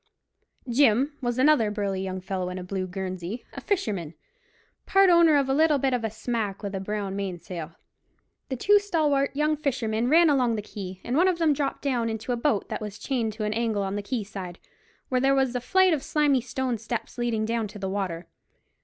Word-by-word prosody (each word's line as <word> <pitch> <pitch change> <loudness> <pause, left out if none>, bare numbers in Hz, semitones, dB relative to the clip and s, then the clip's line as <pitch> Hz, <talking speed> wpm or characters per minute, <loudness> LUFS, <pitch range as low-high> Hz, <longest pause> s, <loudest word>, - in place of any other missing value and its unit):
Jim 265 +3 +3
was 240 -1 -1
another 260 -5 +4
burly 200 -2 -2
young 190 0 -3
fellow 185 -1 -3
in 180 - -5
a 185 - -5
blue 185 0 -3
guernsey, 185 +3 -5
a - - -7
fisherman, 200 - -2 0.7
part 390 -1 +5
owner 340 -3 +6
of 275 -2 +1
a 270 - +1
little 305 +1 +4
bit 270 -1 0
of 245 -2 -1
a 225 - 0
smack 220 -2 -3
with 200 -1 -4
a 195 - -2
brown 200 0 -3
mainsail. 175 -4 -5 0.8
The 265 - -2
two 410 +11 +4
stalwart 300 -8 +1
young 300 +1 +2
fishermen 240 -5 -1
ran 335 +3 +6
along 255 -6 +2
the 210 - -4
quay, 190 -3 -8
and 245 - -2
one 350 +5 +4
of 365 -2 +2
them 325 -3 +3
dropped 280 -1 -2
down 245 -5 0
into 220 +2 -4
a - - +2
boat 235 -3 0
that - - -4
was 210 -1 -6
chained 235 -5 -2
to 215 0 -5
an 210 0 -1
angle 220 -3 0
in 195 - -3
the 205 - -2
quay 220 +2 -3
side, 185 -3 -7 0.5
where 255 -1 +1
there 270 +1 +4
was 265 -2 +1
a 250 - -1
flight 375 +6 +4
of 300 - 0
slimy 290 -4 +2
stone 255 -1 -2
steps 230 +2 -5
leading 230 -3 0
down 225 -1 -1
to 205 +1 -11
the 195 -1 -4
water. 190 -3 -3
230 Hz, 215 wpm, -26 LUFS, 200-275 Hz, 0.8 s, owner